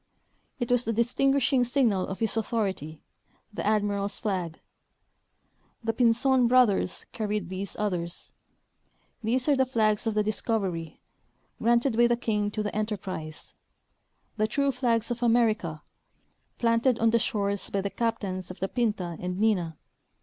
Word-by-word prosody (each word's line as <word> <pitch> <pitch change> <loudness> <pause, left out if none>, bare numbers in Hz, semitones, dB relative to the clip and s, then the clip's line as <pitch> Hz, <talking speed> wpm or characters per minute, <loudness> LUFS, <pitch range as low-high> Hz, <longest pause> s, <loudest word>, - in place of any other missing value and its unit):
It 240 -1 -2
was 245 0 +3
the 225 - 0
distinguishing 255 +3 +2
signal 240 -7 +1
of 190 - -5
his 225 -1 -1
authority, 195 - -2 0.5
the - - -4
admiral's 205 -1 0
flag. 185 -7 -2 1.2
The 225 0 0
Pinzpn 245 +2 +3
brothers 235 -7 +3
carried 210 -4 -2
these 190 +1 -5
others. 175 -5 -3 0.9
These 250 +4 0
are 290 - +5
the 265 -1 +2
flags 215 -3 +1
of 220 - 0
the 210 - +3
discovery, 195 -7 -2 0.6
granted 235 +2 +3
by 240 0 +6
the 240 0 +2
king 210 -3 0
to 210 0 -3
the 210 - -4
enterprise 190 -7 -4 0.4
— - - -45
the 215 0 +2
true 280 +5 +1
flags 235 -3 0
of 240 0 -3
America, 220 -10 +2 0.7
planted 230 +1 +2
on 225 0 +3
the 230 - +3
shores 200 -4 -1
by 200 - -1
the 200 0 -3
captains 200 -6 -2
of 185 - -9
the 190 - -1
Pinta 205 -8 -1
and 180 0 -3
Nina. 180 -8 +1
215 Hz, 145 wpm, -27 LUFS, 195-235 Hz, 1.2 s, by